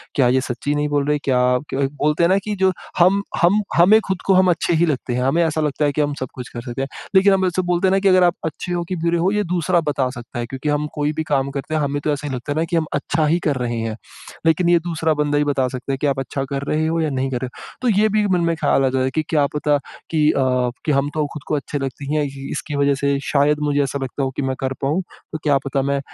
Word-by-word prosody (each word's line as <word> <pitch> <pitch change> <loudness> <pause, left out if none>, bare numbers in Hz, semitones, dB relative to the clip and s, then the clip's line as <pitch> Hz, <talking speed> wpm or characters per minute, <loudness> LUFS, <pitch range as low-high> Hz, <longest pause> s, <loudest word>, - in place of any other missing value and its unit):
क्या 130 -3 +4
ये 130 +1 +3
सच्ची 130 +3 -3
नहीं 150 0 0
बोल 145 -1 +1
रहे, 150 0 +2
क्या 130 -3 +1 0.2
ब - - -11
क 135 0 0
बोलते 150 +3 +2
हैं 170 - +4
ना 190 - +4
कि 210 -1 -2
जो 190 -1 +3 0.3
हम 185 +3 +5 0.2
हम 190 +5 +4 0.2
हमें 190 +6 +7
खुद 190 -2 -2
को 195 - +5
हम 185 0 +5
अच्छे 170 +1 0
ही 165 +1 +3
लगते 135 -4 -2
हैं। 125 +1 0
हमें 160 +6 +2
ऐसा 160 -1 0
लगता 150 0 0
है 145 - +2
कि 150 - 0
हम 145 0 0
सब 130 - -3
कुछ 125 -1 -8
कर 120 - -7
सकते 120 +1 -5
हैं। 135 - -2 0.3
लेकिन 195 +1 +6
हम 190 -1 +2
ऐसे 180 +1 0
बोलते 175 +1 +1
हैं - - +1
ना 195 - +3
कि 195 - +1
अगर 185 -1 +5
आप 175 0 +3
अच्छे 160 +3 -4
हो 175 -1 -1
कि 185 - -1
बुरे 170 0 +2
हो 180 +3 +2
ये 210 0 +1
दूसरा 175 -1 +1
बता 130 -2 0
सकता 120 -2 -8
है 120 - -2
क्योंकि 135 +4 -4
हम 145 0 0
कोई 150 -1 0
भी 160 +1 -2
काम 135 0 +1
करते 140 +2 -5
हैं 155 - +1
हमें 145 0 -1
तो 155 - +1
ऐसा 145 +1 -4
नहीं 135 - -3
लगता 125 +4 -4
ना - - +2
कि 170 - -3
हम 165 -1 +2
अच्छा 155 +2 0
ही 165 +3 +2
कर 145 - +2
रहे 120 -1 -2
हैं। 115 -1 -3 0.5
लेकिन 165 +2 +3
ये 175 -1 +5
दूसरा 160 -1 -1
बंदा 150 -1 0
ही 145 - +3
बता 140 -3 +1
सकता 130 +2 -5
है - - -1
कि 145 - 0
आप 135 -1 0
अच्छा 135 +1 -3
कर 140 0 -2
रहे 155 +1 +1
हो 165 +1 0
या 155 - 0
नहीं 135 -1 -1
कर 125 - -1
रहे 130 - -2
हो। - - -13
तो 250 - +1
ये 215 - +4
भी 215 +1 +2
एक 205 - +1
मन 180 -2 +2
में 170 0 +1
ख्याल 145 -3 +2
आ - - +3
जाता 130 0 0
है 130 - 0
कि 155 - +1
क्या 150 -3 +3
पता 150 0 +2 0.3
कि 155 -2 +3
अ, - - -1 0.5
कि 155 - +2
हम 140 0 +1
तो 155 -1 0
खुद 150 - -8
को - - 0
अच्छे 145 0 -3
लगते 135 +1 -5
हीँ 150 +2 -1
हैं 150 - +2
इ 135 0 -7
इसकी 145 - -4
वज़ह 140 0 +2
से 140 0 0
शायद 145 +1 +2
मुझे 145 -1 +1
ऐसा 140 +1 -3
लगता 135 +2 -3
हो 135 - -1
कि - - -2
मैं 130 -1 -1
कर 130 0 -2
पाऊँ, 150 +7 +1 0.3
तो 155 - -3
क्या 145 -2 +3
पता 140 0 0
मैं 140 - +1
150 Hz, 310 wpm, -20 LUFS, 135-170 Hz, 0.5 s, हमें